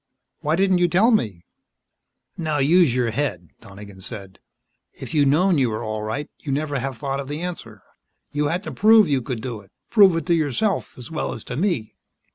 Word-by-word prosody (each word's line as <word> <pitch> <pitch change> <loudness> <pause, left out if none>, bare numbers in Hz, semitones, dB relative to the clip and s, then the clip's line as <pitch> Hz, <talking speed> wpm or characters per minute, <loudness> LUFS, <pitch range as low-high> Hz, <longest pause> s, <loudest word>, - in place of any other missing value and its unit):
"Why 155 0 0
didn't 190 0 +2
you 175 - +4
tell 200 +8 +4
me 105 - 0 0.4
" - - -57 0.2
"Now, 155 -3 -2
use 150 -1 +4
your 120 -2 +1
head," 110 - -3
Donegan 100 -2 -12
said. 95 0 -9 0.5
"If - - -9
you'd 145 -3 +3
known 170 +4 +3
you 130 -3 +2
were 110 +1 -4
all 110 -1 -3
right, 110 +8 -3
you'd 140 -3 -3
never 145 -1 -2
have 130 -1 -4
thought 135 0 -3
of 140 - -5
the 150 +3 -5
answer. 115 - -7 0.5
You 145 0 0
had 175 +6 -2
to - - -6
prove 220 -2 +5
you 140 -3 +1
could 115 -2 -5
do 120 -5 -5
it 100 0 -23 0.2
prove 195 -6 +6
it 165 - -3
to 170 - +2
yourself 165 - 0
as 125 +4 -9
well 155 - -2
as 115 - -9
to - - -6
me." 155 - -1
145 Hz, 210 wpm, -22 LUFS, 115-170 Hz, 0.5 s, prove